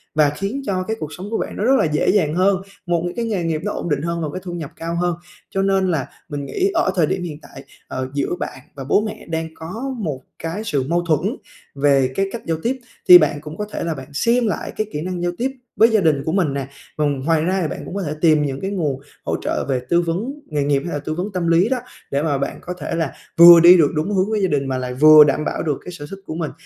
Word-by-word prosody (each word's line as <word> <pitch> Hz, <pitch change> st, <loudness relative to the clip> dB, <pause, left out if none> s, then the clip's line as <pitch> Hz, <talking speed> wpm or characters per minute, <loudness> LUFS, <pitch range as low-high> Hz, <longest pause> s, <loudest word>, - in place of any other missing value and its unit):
và 150 Hz, -1 st, +4 dB
khiến 195 Hz, -, -4 dB
cho 185 Hz, -4 st, -1 dB
cái 220 Hz, +4 st, -3 dB
cuộc 155 Hz, 0 st, -6 dB
sống 190 Hz, +3 st, -7 dB
của 225 Hz, -, 0 dB
bạn -, -, -4 dB
nó -, -, -2 dB
rất 255 Hz, +4 st, +4 dB
là -, -, +2 dB
dễ 150 Hz, -1 st, +1 dB
dàng 160 Hz, -7 st, +2 dB
hơn, 190 Hz, +1 st, +2 dB, 0.2 s
một 175 Hz, -2 st, 0 dB
những 175 Hz, -, -4 dB
cái 235 Hz, -, -2 dB
nghề 205 Hz, -6 st, -1 dB
nghiệp 160 Hz, -2 st, -1 dB
nó 210 Hz, -, -1 dB
ổn -, -, -4 dB
định 145 Hz, -2 st, 0 dB
hơn 170 Hz, +1 st, -2 dB
và 155 Hz, -, -1 dB
cái 185 Hz, -, -5 dB
thu 180 Hz, -2 st, -6 dB
nhập 160 Hz, -5 st, -6 dB
cao 165 Hz, +1 st, -4 dB
hơn. 175 Hz, 0 st, 0 dB, 0.3 s
Cho 195 Hz, -, -1 dB
nên 195 Hz, -1 st, +2 dB
là 145 Hz, -6 st, -1 dB, 0.2 s
mình 145 Hz, -2 st, -4 dB
nghĩ 380 Hz, -, 0 dB
ở -, -, +2 dB
thời 170 Hz, -4 st, +3 dB
điểm 185 Hz, +3 st, -2 dB
hiện 155 Hz, -4 st, -6 dB
tại, 135 Hz, -, -12 dB, 0.2 s
ờ, 130 Hz, 0 st, -4 dB
giữa 140 Hz, +4 st, -1 dB
bạn -, -, -5 dB, 0.2 s
và 135 Hz, -, -6 dB
bố 145 Hz, +9 st, +2 dB
mẹ 215 Hz, 0 st, -6 dB
đang 160 Hz, 0 st, -2 dB
có 225 Hz, +12 st, -5 dB
một 155 Hz, -, -4 dB, 0.2 s
cái 165 Hz, +6 st, -4 dB
sự 145 Hz, -10 st, 0 dB
mâu 170 Hz, +1 st, +2 dB
thuẫn 155 Hz, -4 st, 0 dB, 0.4 s
về 140 Hz, -2 st, +3 dB
cái 195 Hz, -, +1 dB
cách 235 Hz, -, -5 dB
giao 165 Hz, -1 st, 0 dB
tiếp, 260 Hz, +3 st, -1 dB, 0.3 s
thì 180 Hz, -, +13 dB
bạn 150 Hz, -3 st, +1 dB
cũng 155 Hz, +1 st, -9 dB
có 210 Hz, -, -3 dB
thể -, -, -3 dB
là 165 Hz, -1 st, -1 dB
bạn 135 Hz, -2 st, -9 dB
xem 235 Hz, -, +2 dB
lại -, -, -3 dB
cái 215 Hz, -1 st, -1 dB
kỹ 150 Hz, -, -3 dB
năng 180 Hz, +1 st, -4 dB
giao 175 Hz, -, +1 dB
tiếp 260 Hz, +3 st, -1 dB, 0.3 s
với 225 Hz, -, +6 dB
gia 220 Hz, -2 st, +3 dB
đình 150 Hz, -5 st, +2 dB
của 160 Hz, -, 0 dB
mình 170 Hz, -6 st, +1 dB
nè. 140 Hz, -1 st, -3 dB, 0.3 s
Vần 145 Hz, -3 st, 0 dB
ngoài 155 Hz, +3 st, +1 dB
ra 185 Hz, +2 st, 0 dB
thì 160 Hz, -, 0 dB
bạn -, -, -6 dB
cũng -, -, -7 dB
có 200 Hz, -, -2 dB
thể 150 Hz, -3 st, -3 dB
tìm 155 Hz, -3 st, +4 dB
những 135 Hz, -1 st, -4 dB
cái 195 Hz, -, -3 dB
nguồn 150 Hz, -9 st, -2 dB, 0.2 s
hỗ -, -, -1 dB
trợ -, -, -2 dB
về 130 Hz, -2 st, 0 dB
tư 170 Hz, 0 st, +4 dB
vấn 180 Hz, +10 st, -2 dB
nghề 150 Hz, -2 st, -1 dB
nghiệp 140 Hz, -1 st, +1 dB
hay 175 Hz, -, -4 dB
là 145 Hz, -, -2 dB
tư 155 Hz, -, -2 dB
vấn 185 Hz, +5 st, -3 dB
tâm 180 Hz, -2 st, -1 dB
lý 170 Hz, +6 st, +4 dB
đó, 260 Hz, -, +1 dB, 0.3 s
để 140 Hz, +1 st, 0 dB
mà 145 Hz, -4 st, +1 dB
bạn 140 Hz, -, -3 dB
có 180 Hz, -, -5 dB
thể 155 Hz, +2 st, -3 dB
là 165 Hz, -4 st, -1 dB, 0.2 s
vừa 170 Hz, 0 st, +11 dB
đi 175 Hz, +2 st, +9 dB
được 155 Hz, -4 st, +4 dB
đúng 160 Hz, +7 st, -1 dB
hướng 190 Hz, +3 st, +1 dB
với 215 Hz, -1 st, 0 dB
gia -, -, +3 dB
đình 140 Hz, -2 st, 0 dB
mà 130 Hz, -1 st, -1 dB
lại 125 Hz, 0 st, -4 dB
vừa 155 Hz, +2 st, +9 dB
đảm 150 Hz, +1 st, 0 dB
bảo -, -, -2 dB
được 150 Hz, -4 st, -1 dB
cái 180 Hz, -, -6 dB
sở 150 Hz, -4 st, -8 dB
thích 195 Hz, -, -7 dB
của 155 Hz, -, -5 dB
mình. 160 Hz, -2 st, -3 dB
165 Hz, 290 wpm, -20 LUFS, 150-190 Hz, 0.4 s, thì